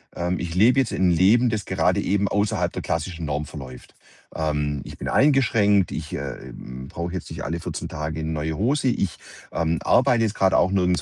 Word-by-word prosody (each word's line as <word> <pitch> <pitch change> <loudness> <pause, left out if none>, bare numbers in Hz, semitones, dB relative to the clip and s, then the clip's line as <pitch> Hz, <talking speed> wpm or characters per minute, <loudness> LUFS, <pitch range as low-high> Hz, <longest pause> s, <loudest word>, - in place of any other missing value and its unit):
ähm, 90 +1 -1
ich 85 0 -4
lebe 120 +7 +5
jetzt 130 -4 0
'n 95 - +2
Leben, 105 +8 +4
das 110 -4 -2
gerade - - +1
eben 100 +1 +1
außerhalb 100 -4 0
der - - -5
klassischen 85 0 -3
Norm 75 0 -2
verläuft. 65 -5 -10 0.4
Ähm, 75 -2 -1
ich - - -10
bin - - -5
eingeschränkt. 110 - +3
Ich, - - -5
ähm, 65 +1 -7
brauche 85 +4 -5
jetzt 90 - -6
nicht - - -6
alle 80 +5 -3
14 - - -5
Tage 80 +1 -4
'ne 80 - -2
neue 80 0 -2
Hose. 135 +6 +1
Ich, 100 -7 -1 0.3
ähm, 80 0 0
arbeite 120 -2 +3
jetzt 110 -1 -1
grad 95 -1 +3
auch 90 - +4
nirgends 90 -2 +2
90 Hz, 195 wpm, -23 LUFS, 80-105 Hz, 0.4 s, lebe